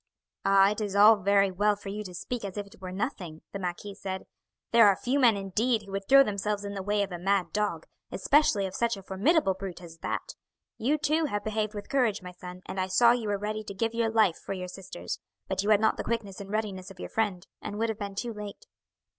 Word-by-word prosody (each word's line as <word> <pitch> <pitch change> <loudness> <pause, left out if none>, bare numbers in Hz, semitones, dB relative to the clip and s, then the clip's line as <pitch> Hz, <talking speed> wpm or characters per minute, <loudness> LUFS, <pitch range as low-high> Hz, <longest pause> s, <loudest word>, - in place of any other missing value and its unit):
"Ah, 195 0 +5
it 210 - -3
is 205 -2 -2
all 210 +2 +8
very 200 0 +3
well 205 +3 +2
for 200 -1 -9
you 210 +2 -4
to 180 -2 -8
speak 240 +6 -4
as 200 0 -5
if 205 - -3
it 200 -1 -18
were 185 -1 -6
nothing!" 185 - -4
the 200 - -5
marquis 185 +2 -4
said. 190 -1 -5 0.5
"There 230 -2 +7
are 200 - +5
few 260 +7 0
men, 235 -6 +5
indeed, 215 +4 0
who 200 - -12
would 195 0 -4
throw 275 +1 +9
themselves 205 -2 -2
in 200 - -4
the 195 - -4
way 205 +1 +1
of 195 - -5
a 175 - -5
mad 195 0 +1
dog, 210 -1 -1 0.3
especially 280 -9 +3
of 190 - -5
such 235 0 0
a 195 - -10
formidable 195 - +2
brute 190 -2 -7
as 165 -2 -12
that. - - -4 0.5
You 280 +7 +2
too 310 +2 +1
have 205 -8 -2
behaved 215 0 -2
with 205 - -6
courage, 225 -7 +1
my 180 - -7
son, 180 0 -10
and 190 - -5
I 185 - 0
saw 235 +6 +5
you 240 -3 0
were 205 -1 0
ready 215 +2 -3
to 200 -2 -8
give 225 +3 -1
your 230 -1 +1
life 215 -6 +3
for - - -4
your 180 -1 -5
sisters; 180 -1 -6 0.3
but 190 0 0
you 205 - -1
had 210 -2 +6
not 220 - +2
the - - -3
quickness 210 -4 -3
and 195 - -9
readiness 200 -3 -3
of 190 -2 -14
your - - -6
friend, 200 -5 -1 0.2
and 205 - -5
would 225 +1 0
have 220 -1 -3
been 200 -1 -5
too 235 +3 -3
late." 210 -1 -8
205 Hz, 250 wpm, -28 LUFS, 190-220 Hz, 0.5 s, throw